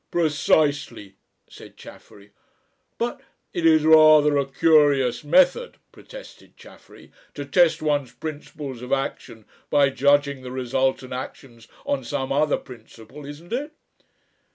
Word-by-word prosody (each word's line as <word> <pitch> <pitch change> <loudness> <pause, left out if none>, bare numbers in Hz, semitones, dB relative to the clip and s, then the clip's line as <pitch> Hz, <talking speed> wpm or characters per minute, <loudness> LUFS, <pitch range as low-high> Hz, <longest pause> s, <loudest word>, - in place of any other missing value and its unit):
"Precisely!" 150 - 0 0.3
said - - -15
Chaffery. 100 0 -16 0.7
"But 240 +3 -4 0.2
" - - -51
"It 170 -2 +1
is 155 -1 +4
rather 155 -2 +6
a 140 -1 0
curious 140 -5 +2
method," 280 - +2
protested - - -15
Chaffery; - - -17 0.2
"to 145 - -6
test 165 +1 +2
one's 145 -5 -1
principles 145 -1 -8
of 125 - -9
action 135 -5 -4 0.2
by 140 -1 +3
judging 140 +1 +1
the 130 - -9
resultant 130 0 -2
actions 125 -2 -9 0.2
on 285 0 -2
some 135 -3 -4
other 150 +2 +1
principle, 120 +3 -14
isn't 155 +7 -10
it?" 290 +5 -4
145 Hz, 125 wpm, -22 LUFS, 130-155 Hz, 0.7 s, rather